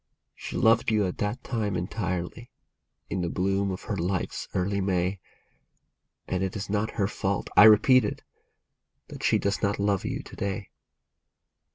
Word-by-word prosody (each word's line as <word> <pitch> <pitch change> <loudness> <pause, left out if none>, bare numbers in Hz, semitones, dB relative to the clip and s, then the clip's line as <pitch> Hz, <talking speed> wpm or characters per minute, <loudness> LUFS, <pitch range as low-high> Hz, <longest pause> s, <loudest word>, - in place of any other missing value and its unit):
She - - -6
loved 115 +1 +4
you 105 -2 +2
at 90 - -4
that 105 +5 -2
time 105 -5 -2
entirely, 95 +4 -3 0.6
in 95 - -1
the 85 - -1
bloom 95 +2 0
of 95 0 -5
her 105 - -3
life's 90 0 -2
early 100 +2 0
May, 95 0 0 1.1
And 90 - -1
it 95 -1 -2
is 100 -1 -5
not 105 +1 -1
her 100 -3 +2
fault, 100 -2 -2
I 105 - +9
repeat 110 +4 +7
it, 105 - -4 0.9
that - - -9
she - - +3
does 100 0 -1
not 100 -1 +1
love 100 -1 +1
you - - -3
to - - -12
day. 100 0 -4
100 Hz, 165 wpm, -27 LUFS, 95-105 Hz, 1.1 s, I